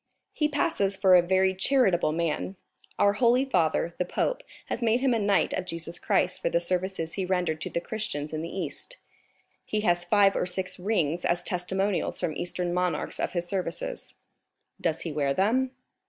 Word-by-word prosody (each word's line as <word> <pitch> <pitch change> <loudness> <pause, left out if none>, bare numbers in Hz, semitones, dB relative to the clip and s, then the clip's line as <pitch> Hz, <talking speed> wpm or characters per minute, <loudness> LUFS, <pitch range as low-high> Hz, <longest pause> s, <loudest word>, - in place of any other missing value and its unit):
"He 300 - +1
passes 200 -10 0
for 190 -1 +5
a 180 - +8
very 190 +2 +2
charitable 190 - +2
man. 170 +3 -2 0.4
Our 200 0 +4
holy 245 +4 +3
father, 170 - +1
the - - +3
pope, - - -1 0.2
has - - -4
made 230 +1 +3
him 265 -2 +3
a 230 - +1
knight 200 -2 +2
of 185 - -3
Jesus 170 0 -5
Christ - - +1
for - - +1
the 170 - +2
services 180 -1 -1
he 195 - -2
rendered 180 -4 -1
to - - -3
the 170 - -2
Christians 155 -9 -4
in 155 - -2
the 165 - -5
East; 190 - -6 0.7
he 215 - -2
has 175 -4 +2
five 200 +2 +4
or - - 0
six 185 +1 -3
rings 175 -4 0
as 175 +1 +1
testimonials 190 +1 -1
from 175 -4 -1
Eastern 175 0 -2
monarchs 180 0 -1
of - - -1
his 175 -1 -1
services." - - -4 0.7
"Does 165 -1 0
he 165 - -4
wear 140 -2 0
them?" 240 +7 +2
185 Hz, 185 wpm, -27 LUFS, 170-205 Hz, 0.7 s, a